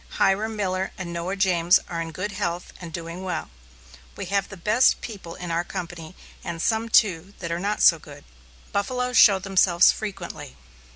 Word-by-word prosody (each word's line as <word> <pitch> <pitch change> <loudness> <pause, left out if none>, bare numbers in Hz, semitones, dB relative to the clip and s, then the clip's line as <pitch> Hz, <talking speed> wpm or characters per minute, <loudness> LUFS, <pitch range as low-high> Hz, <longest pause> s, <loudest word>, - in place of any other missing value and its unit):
Hiram 215 +3 +2
Miller 190 -2 -1
and 175 -2 -6
Noah 170 +3 -3
James 180 -2 +4
are 170 -1 -4
in 165 0 -5
good 185 +6 -4
health 175 -2 -4
and 170 -2 -8
doing 170 +2 -6
well. 180 -4 -4 0.7
We - - -4
have 200 -1 +2
of - - -19
the 195 - -9
best 215 +8 +3
people 195 -7 -8
in 175 -1 -6
our 170 +1 0
company, 175 -2 -7 0.3
and 170 -1 -5
some, 225 +5 0
too, 195 -3 +2
that 170 -2 -5
are 170 - -1
not 205 +3 -1
so 165 - +7
good. 145 -1 -13 0.5
Buffaloes 250 +5 -1
show 200 -2 +8
themselves 185 -2 +4
frequently. 175 -9 -7
185 Hz, 180 wpm, -24 LUFS, 170-200 Hz, 0.7 s, show